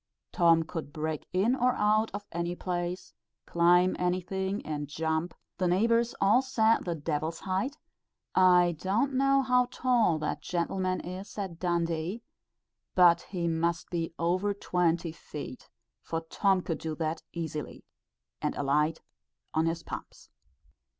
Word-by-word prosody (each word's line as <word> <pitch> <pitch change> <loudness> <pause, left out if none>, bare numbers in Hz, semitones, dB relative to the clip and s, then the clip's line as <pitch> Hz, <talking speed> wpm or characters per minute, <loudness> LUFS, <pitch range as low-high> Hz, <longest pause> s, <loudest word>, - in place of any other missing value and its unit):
Tom 165 -3 +4
could 160 -2 -6
break 155 0 -4
in 205 +8 +2
or 250 -1 +2
out 215 -1 +2
of 205 0 -6
any 170 +1 -2
place, 175 0 -4 0.3
climb 175 +2 +4
anything, 185 +2 -1
and 150 -1 -3
jump 160 +3 -2 0.2
the 185 - +2
neighbours 230 +6 +2
all 210 +6 +5
said 230 -4 +2
"the 170 -2 -1
d 155 +1 -4
l's 155 +2 -2
height;" 195 +10 -2 0.6
I 180 -2 +5
don't 220 - 0
know 275 +1 +3
how 250 -1 +3
tall 240 -10 +2
that 155 - -3
gentleman 185 +1 -1
is 185 +4 -8
at 190 -5 -4
Dundee, 170 +4 -1 0.7
but 175 -2 +6
he 175 -3 -2
must 165 0 -1
be 165 -2 -2
over 185 +4 0
twenty 175 -3 0
feet, 150 -4 -9 0.3
for 165 0 -3
Tom 190 +3 +1
could 165 -3 -3
do 160 -1 -4
that 160 0 -2
easily, 160 -3 -5 0.6
and - - -1
alight 150 +3 +1 0.5
on 160 +1 +2
his 165 0 -2
pumps. - - -9
175 Hz, 140 wpm, -29 LUFS, 165-200 Hz, 0.7 s, but